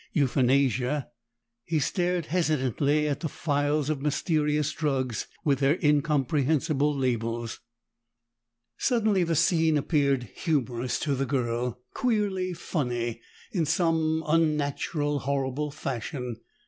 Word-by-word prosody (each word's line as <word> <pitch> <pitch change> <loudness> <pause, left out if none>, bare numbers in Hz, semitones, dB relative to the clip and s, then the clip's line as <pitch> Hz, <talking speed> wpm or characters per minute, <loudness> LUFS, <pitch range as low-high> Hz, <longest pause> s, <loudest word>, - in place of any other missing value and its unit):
Euthanasia!" 135 - +2 0.5
He 165 +5 -1
stared 175 +3 0
hesitantly 150 - +1
at 145 -2 -1
the 160 - -3
files 145 -1 0
of 150 -3 -1
mysterious 150 0 +1
drugs 130 -7 -1 0.2
with 140 -3 +2
their 140 +4 +3
incomprehensible 150 0 +2
labels. 115 -3 -2 1.2
Suddenly 215 -6 +2
the 165 0 0
scene 160 -1 +3
appeared 140 -3 +1
humorous 125 -5 -1
to 145 - 0
the 135 0 -1
girl, 125 -2 -1
queerly 205 -7 0
funny, 120 -9 -2 0.3
in 170 -6 0
some 160 -1 +1
unnatural 150 -1 +1
horrible 140 +1 -1
fashion. 125 -2 -4
145 Hz, 105 wpm, -27 LUFS, 130-160 Hz, 1.2 s, their